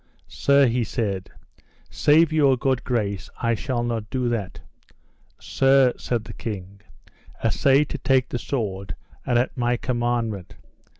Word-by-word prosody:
Sir, 140 0 +3
he 120 0 +1
said, 100 -4 -3 0.6
save 155 +2 +4
your 140 -4 +4
good 130 0 0
grace 100 -6 -2
I 115 -1 +1
shall 120 +1 -2
not 115 -3 -3
do 125 -2 -1
that. 115 -5 -3 0.8
Sir, 135 -2 +3
said 120 -3 -2
the 115 -1 -10
king, 100 -3 -7 0.6
assay 140 +1 +3
to 150 - -6
take 130 -1 +2
the 120 - -3
sword 100 - -3 0.3
and 120 - +2
at 120 - 0
my 120 -1 0
commandment. 120 -6 -2
120 Hz, 135 wpm, -23 LUFS, 110-135 Hz, 0.8 s, save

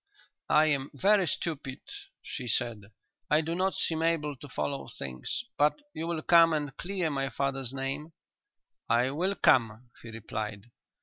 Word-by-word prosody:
"I 155 +1 +6
am 140 -3 +1
very 195 +6 +4
stupid," 140 -3 -2 0.4
she 125 -3 -5
said. 110 -2 0 0.4
"I 150 +1 +5
do 160 +1 -3
not 185 +2 0
seem 160 -1 0
able 160 -3 +1
to 145 - -10
follow 140 +2 -3
things. 65 -2 -4 0.2
But 150 - +3
you 160 +1 -4
will 165 -2 -2
come 165 -1 +6
and 145 -3 -2
clear 180 -2 -2
my 135 -1 -1
father's 135 -3 -1
name?" 135 +4 -3 0.8
"I 120 +3 +3
will 185 +7 0
come," 120 - +3
he 115 - -10
replied. 110 -1 -5
145 Hz, 150 wpm, -29 LUFS, 125-165 Hz, 0.8 s, I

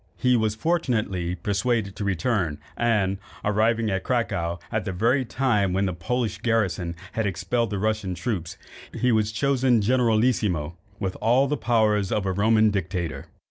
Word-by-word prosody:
He 125 -1 +3
was 110 -2 +1
fortunately 110 - -1
persuaded 100 +2 -1
to - - -4
return, 95 -4 0 0.2
and, 105 -5 +1 0.3
arriving 110 +1 +2
at 95 0 -1
Cracow 85 -9 -1
at 110 -2 -1
the 95 - -3
very 115 +9 +2
time 115 -7 +1
when 95 +1 +1
the 95 - -1
Polish 110 +6 -2
garrison 100 -7 0 0.2
had 110 -2 -1
expelled 115 +5 -1
the 100 - -2
Russian 105 -2 -1
troops, 90 -3 -3 0.4
he 125 0 +3
was 110 -1 +2
chosen 130 0 +2
generalissimo, 110 -8 +1 0.2
with 95 -3 -2
all 125 +5 +3
the 150 - 0
power 110 -4 +2
of 100 0 -1
a 95 - +1
Roman 110 +2 +3
dictator. 90 -4 -3
110 Hz, 155 wpm, -25 LUFS, 95-120 Hz, 0.4 s, He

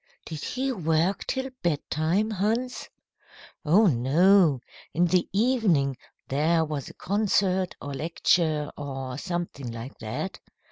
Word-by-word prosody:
"Did 155 -3 -6
he 265 +1 -1
work 170 -2 0
till 265 0 -2
bedtime, 170 +5 0
Hans?" 225 +5 -1 0.7
"Oh, 180 +8 +5
no. 160 - +4 0.4
In 175 +2 +4
the 180 0 +1
evening 195 - +2 0.3
there 160 +4 +2
was 150 -3 -4
a - - -13
concert 190 -2 +1
or 145 - -6
lecture, 155 0 +1
or 135 -2 -5
something 175 -9 -4
like 115 +3 -8
that. 110 -1 -5
170 Hz, 120 wpm, -26 LUFS, 145-200 Hz, 0.7 s, Oh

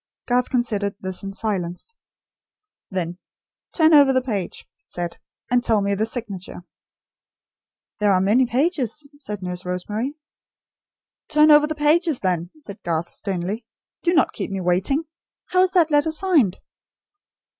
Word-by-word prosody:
Garth 250 0 +1
considered 210 -6 -1
this 190 -1 -2
in 195 - -5
silence. 195 - -3 1.0
Then: 180 -2 -3 0.5
"Turn 320 -1 +4
over 285 -2 +7
the 260 -1 +2
page," 205 -8 -4
he - - -45
said, 175 -1 -5 0.3
"and 245 -1 +3
tell 220 -2 +3
me 200 0 0
the 215 +3 0
signature." 200 -7 -5 1.4
"There 210 -1 +3
are 185 - +4
many 220 +7 +3
pages," 270 - 0
said 210 -8 -6
Nurse 180 0 -3
Rosemary. 210 - -3 1.1
"Turn 305 0 +5
over 300 0 +7
the 310 - -3
pages 305 0 +2
then," 175 -2 -1
said 200 -3 -10
Garth, 170 0 -2
sternly. 195 +4 -4 0.3
"Do 345 0 +1
not 325 - +3
keep - - -4
me 195 -1 -3
waiting. 185 - +1 0.5
How 365 - +4
is 370 0 +2
that 335 -4 +4
letter 295 +2 +3
signed?" 315 - +2
220 Hz, 145 wpm, -22 LUFS, 185-295 Hz, 1.4 s, over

